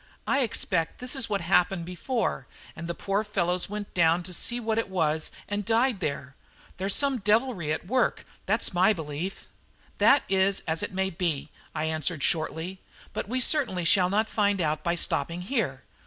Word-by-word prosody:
I 275 - +2
expect 220 - 0
this 250 +2 -2
is 265 -5 0
what 200 -2 0
happened 175 0 +2
before, 225 +8 -2 0.3
and 165 +1 -6
the 170 - -3
poor 200 +2 -1
fellows 180 -4 -1
went 205 0 -6
down 170 0 +3
to 180 +1 -4
see 240 +8 +1
what 225 -1 0
it 225 - -2
was 160 -4 +1 0.2
and 205 0 -2
died 230 +1 +2
there. 140 -5 -3 0.4
There's 190 +2 0
some 275 -3 +2
devilry 210 - +1
at 155 - -2
work, 255 +7 0 0.2
that's - - +2
my 185 +4 +4
belief." 160 +2 -5 0.5
"That 280 - +6
is 190 0 +2
as 160 0 -1
it - - -3
may 190 0 -1
be," 165 -5 -2 0.2
I 155 - -1
answered 160 -1 -1
shortly; 165 +3 -1 0.3
"but - - -4
we 255 +2 0
certainly 245 - +3
shall 180 +1 +4
not 215 +3 +1
find 205 -3 +1
out 155 -2 0
by 170 0 +1
stopping 170 +1 -1
here. 185 - -2
185 Hz, 180 wpm, -27 LUFS, 165-215 Hz, 0.5 s, That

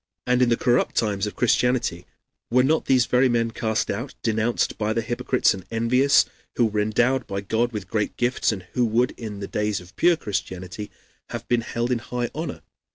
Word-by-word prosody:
And 125 0 +2
in 125 - +4
the 115 - +3
corrupt 120 0 +1
times 105 -2 0
of 105 - -6
Christianity 120 -7 +1 0.4
were 125 +2 +4
not 155 +4 +2
these 130 -3 +4
very 125 +2 +3
men 115 -1 +1
cast 110 -1 -1
out, 120 +7 -5
denounced 110 +1 0
by 110 0 0
the 115 0 -1
hypocrites 120 +2 +1
and 95 -2 -8
envious, 125 +5 +3 0.3
who 120 - +3
were 105 -1 -1
endowed 120 +5 +1
by 100 0 -3
God 115 +4 0
with 105 -5 -5
great 105 0 -2
gifts 120 0 +1
and 95 -4 -5
who 125 - +2
would 120 +2 +2
in 105 -3 -7
the 100 - -4
days 105 -1 -1
of 90 +1 -15
pure 175 0 +5
Christianity 95 - -5 0.4
have - - -6
been 120 -1 +2
held 120 +1 -2
in 120 - +1
high 120 +1 -3
honor? - - -5
115 Hz, 200 wpm, -24 LUFS, 105-125 Hz, 0.4 s, pure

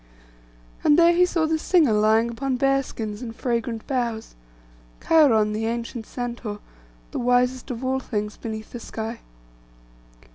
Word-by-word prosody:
And 295 - +5
there 340 0 +6
he 360 +1 +4
saw 330 -3 +1
the 315 0 0
singer 315 - +3
lying 220 +2 +3
upon 260 +2 -2
bear 275 +1 +3
skins 215 -4 -6
and 230 -2 -6
fragrant 235 -2 -2
boughs: 235 -4 -2 0.7
Cheiron, 230 -10 +4
the 220 +1 -2
ancient 230 -1 -4
centaur, 235 -4 -5 0.5
the - - -3
wisest 250 +1 +1
of 250 0 -4
all 265 +1 +1
things 210 -4 -4
beneath 220 -1 -7
the 240 - -6
sky. 225 0 -6
240 Hz, 145 wpm, -24 LUFS, 220-270 Hz, 0.7 s, there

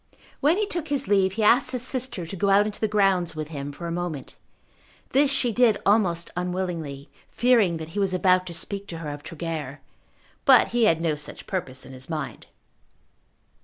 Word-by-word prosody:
When 310 +6 +3
he 425 - +1
took 345 -6 -4
his 280 -2 -1
leave 190 -2 +3
he 215 +2 -1
asked 250 +5 +5
his 250 -2 -2
sister 255 -8 -2
to 170 - -7
go 200 +2 0
out 200 +1 +5
into 210 -1 -5
the 220 - +2
grounds 195 -5 +2
with 155 -1 -5
him 145 -2 -5
for 170 +4 -9
a 170 - -3
moment. 170 -4 -4 0.8
This 280 +1 +4
she 265 -3 +1
did 225 -2 +4
almost 185 -5 +2
unwillingly, 175 -6 -4 0.2
fearing 230 -9 +3
that 160 0 -7
he 205 - -4
was 195 -2 +1
about 185 0 +3
to 175 - -6
speak 200 +4 -3
to 165 - -6
her 155 -2 -5
of 145 0 -7
Tregear. 155 -4 -5 0.6
But 265 -2 +6
he 235 -1 +2
had 165 -5 +3
no 165 -2 +1
such 150 0 -7
purpose 135 -9 -4
on 130 - -11
his 130 +2 -8
mind. 160 -2 -5
185 Hz, 200 wpm, -25 LUFS, 165-220 Hz, 0.8 s, But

